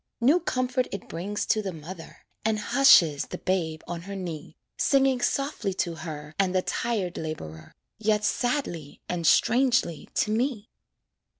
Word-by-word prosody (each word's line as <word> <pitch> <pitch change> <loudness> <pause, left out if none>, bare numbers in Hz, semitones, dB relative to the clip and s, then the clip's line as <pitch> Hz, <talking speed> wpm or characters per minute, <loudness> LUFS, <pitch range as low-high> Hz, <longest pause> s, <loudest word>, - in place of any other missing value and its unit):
New 275 +9 +4
comfort 255 -5 -1
it 200 - -6
brings 195 +5 -3
to 215 - +2
the 195 -2 -4
mother, 165 +1 -10 0.2
And 220 0 +1
hushes 185 - +5
the 180 - -6
babe 165 -5 -1
on 170 -1 -4
her 200 - -4
knee, 165 -5 -6 0.2
Singing 270 -2 +3
softly 275 -9 -1
to 175 -2 -1
her 155 -2 -7
And 190 -1 +2
the 185 - +2
tired 210 -7 -2
laborer, 80 - -7 0.2
Yet 215 -1 +1
sadly 215 - -1
and 170 -3 -1
strangely 245 - +3
to 215 - +1
me. 230 -1 -1
195 Hz, 145 wpm, -26 LUFS, 165-245 Hz, 0.2 s, hushes